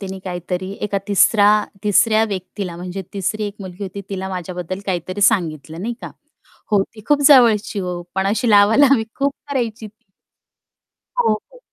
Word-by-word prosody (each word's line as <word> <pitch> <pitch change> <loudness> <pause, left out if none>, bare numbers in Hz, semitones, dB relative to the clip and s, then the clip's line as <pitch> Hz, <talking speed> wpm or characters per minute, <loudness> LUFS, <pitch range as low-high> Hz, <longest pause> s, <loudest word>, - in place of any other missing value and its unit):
तिने 190 -1 -6
काहीतरी 180 +1 -4
एका 200 -1 -1
तिसरा 205 +1 +5 0.4
तिसऱ्या 215 +2 +4
व्यक्तीला 190 -3 -5
म्हणजे 180 +2 -6
तिसरी 205 +2 -2
एक 200 - -7
मुलगी 190 +1 -8
होती 200 +1 -6
तिला 190 -1 -4
माझ्याबद्दल 180 0 -5
काहीतरी 185 +1 -3
सांगितलं 165 -6 +1
नाही 235 +2 -3
का? - - -6 0.6
हो, 205 -2 +4
ती 215 - -11
खूप 290 -1 +3
जवळची 225 -7 +5
हो. 180 -2 -4
पण 190 0 0
अशी 220 +3 +1
लावालावी 225 +5 +5
खूप 280 0 0 0.2
करायची 230 -5 -2
ती. 215 0 -20 1.1
हो, 480 - +3
हो. 355 - -7
200 Hz, 155 wpm, -19 LUFS, 185-220 Hz, 1.1 s, तिसरा